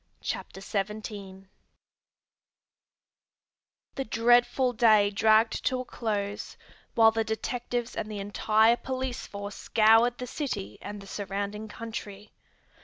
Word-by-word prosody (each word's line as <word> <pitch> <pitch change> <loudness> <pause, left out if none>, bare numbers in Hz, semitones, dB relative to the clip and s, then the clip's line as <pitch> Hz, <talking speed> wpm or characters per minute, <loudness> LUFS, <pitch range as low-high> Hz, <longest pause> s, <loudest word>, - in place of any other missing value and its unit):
CHAPTER 190 - -5
XVII 200 -1 -5 2.5
The 270 - -3
dreadful 240 +2 +3
day 215 -3 +5
dragged 220 +3 +3
to 255 -1 +1
a - - -8
close, 205 -4 -3 0.4
while 225 -1 +7
the 225 0 0
detectives 240 +2 -3
and 215 - -4
the 210 - -5
entire 215 +3 +3
police 260 -1 -4
force 200 0 -6
scoured 225 +2 +4
the 250 - -5
city 245 - -4
and 205 0 -7
the - - -11
surrounding 200 +2 -4
country. 210 -2 -8
220 Hz, 110 wpm, -28 LUFS, 205-240 Hz, 2.5 s, while